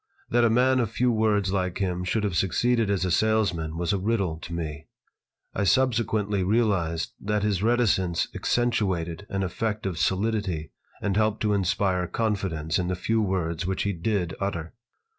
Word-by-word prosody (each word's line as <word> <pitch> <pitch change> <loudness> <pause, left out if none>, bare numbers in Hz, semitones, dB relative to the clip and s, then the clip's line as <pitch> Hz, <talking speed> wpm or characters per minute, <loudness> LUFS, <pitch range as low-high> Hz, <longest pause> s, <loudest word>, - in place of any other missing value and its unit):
That 120 0 +4
a 115 - +5
man 130 +3 +3
of 115 -4 0
few 125 +2 +1
words 105 -4 +1
like 90 -2 -1
him 90 -2 -1
should 105 +4 0
have 100 -4 -1
succeeded 115 +5 +2
as 95 -2 +1
a 90 - -1
salesman 90 -7 +1
was 85 +1 0
a 100 - 0
riddle 95 -6 0
to 85 - -9
me. 80 -2 -5 0.7
I - - -1
subsequently 110 -4 +2
realized 95 -6 +1
that 105 0 -1
his 100 -3 +1
reticence 105 -7 +2
accentuated 95 -7 -1
an 100 0 -1
effect 105 +3 -2
of 90 -5 -2
solidity 95 -5 0 0.3
and 100 -2 0
helped 110 0 +1
to 105 -1 +2
inspire 95 -1 +1
confidence 95 -8 -1
in 90 - -1
the 90 - -1
few 110 +5 0
words 90 -4 -1
which 95 0 -1
he 100 - 0
did 90 -1 -1
utter. 85 -5 -3
100 Hz, 170 wpm, -26 LUFS, 90-110 Hz, 0.7 s, a